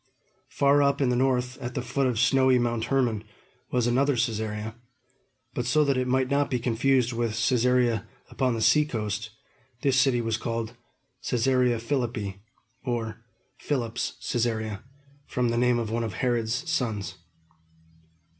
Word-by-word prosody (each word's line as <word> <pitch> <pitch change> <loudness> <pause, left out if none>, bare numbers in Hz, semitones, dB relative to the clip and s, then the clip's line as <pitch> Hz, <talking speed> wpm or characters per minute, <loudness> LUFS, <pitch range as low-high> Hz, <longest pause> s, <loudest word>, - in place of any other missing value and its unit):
Far 140 +1 +3
up 140 0 +2
in 135 -3 +2
the 125 - +2
north, 125 0 0
at 125 -2 -6
the 125 - -2
foot 130 +2 0
of 125 -3 -1
snowy 130 0 +4
Mount 120 -2 0
Hermon, 120 -6 +1 0.5
was 125 -2 +1
another 135 +3 +2
Cæsarea; 110 -2 -2 0.8
but 120 - -2
so 155 +4 +4
that 140 -1 +2
it 130 0 0
might 130 0 +2
not 140 +1 +1
be 125 - 0
confused 125 +1 +1
with 115 -1 -1
Cæsarea 120 -1 +2 0.2
upon 130 -3 0
the 110 - -1
seacoast 110 -4 +1 0.5
this 135 -1 +3
city 125 -2 +3
was 115 -1 -1
called 115 0 -3 0.5
Cæsarea 125 -1 +2
Philippi, 115 -6 -2 0.4
or 115 -3 -3 0.4
"Philip's 120 -5 -2
Cæsarea," 110 -4 -2 0.5
from 125 -1 0
the 120 - 0
name 125 0 +3
of 115 -2 -2
one 115 +1 0
of 110 -4 -3
Herod's 120 - -1
sons. 115 -10 -2
120 Hz, 145 wpm, -26 LUFS, 115-130 Hz, 0.8 s, snowy